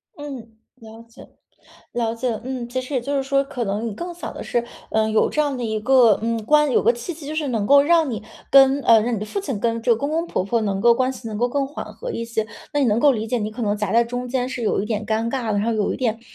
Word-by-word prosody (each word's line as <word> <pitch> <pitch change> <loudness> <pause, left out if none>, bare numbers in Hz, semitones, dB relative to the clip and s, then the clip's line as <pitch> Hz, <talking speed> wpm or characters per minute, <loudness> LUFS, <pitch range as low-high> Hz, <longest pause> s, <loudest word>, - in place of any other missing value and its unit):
嗯， 270 -7 -8 0.2
了 225 -2 -13
解 230 +2 -15 0.7
了 230 -1 -1
解。 230 -2 -2
嗯， 255 -2 -4
其 255 +2 -2
实 255 +3 -9
也 255 - +1
就 280 +4 -2
是 275 - +1
说， 275 +1 +1
可 250 -3 -4
能 210 +2 -2
你 220 - -4
更 345 - -6
想 345 - -7
的 - - -6
是， 240 - 0 0.3
呃， 220 0 +1
有 220 - +2
这 305 - 0
样 290 -3 0
的 245 - -4
一 220 -1 -2
个， 240 -2 +5
嗯， 230 -1 -1
关 300 +3 +4
有 - - +3
个 235 - +4
契 245 +9 -6
机 305 -2 -11
就 305 - -4
是 310 -2 -1
能 225 -5 -1
够 280 +3 +7
让 320 -1 +3
你 220 -3 -4 0.3
跟， 275 0 +6
呃， 230 -2 +6
让 235 +3 -1
你 - - -2
的 210 - -4
父 400 - -4
亲 270 - -4
跟 230 +2 -1
这 235 - 0
个 - - +2
公 280 +6 -3
公 330 +2 -1
婆 185 - -2
婆 230 +4 0
能 200 -3 -1
够 235 +2 +5
关 255 +2 +1
系 250 -2 -10
能 215 -2 -4
够 245 +2 +1
更 275 +2 -1
缓 285 - -7
和 - - -6
一 - - -3
些。 225 -2 -2 0.3
那 290 - +1
也 275 - +3
能 220 0 +2
够 285 +1 +5
理 220 -3 -3
解 245 +2 -1
你 210 -1 -3
可 235 +3 -6
能 205 -2 +1
夹 210 -2 -2
在 235 +1 +5
中 245 +1 -5
间 250 0 -1
是 255 -2 -5
有 215 - +1
一 - - -3
点 215 -1 -3
尴 225 +1 0
尬 240 -4 -2
的， 205 - +1
然 - - 0
后 230 +2 0
有 215 -2 0
一 - - -5
点， 230 -3 -1
235 Hz, 325 characters per minute, -22 LUFS, 220-270 Hz, 0.7 s, 够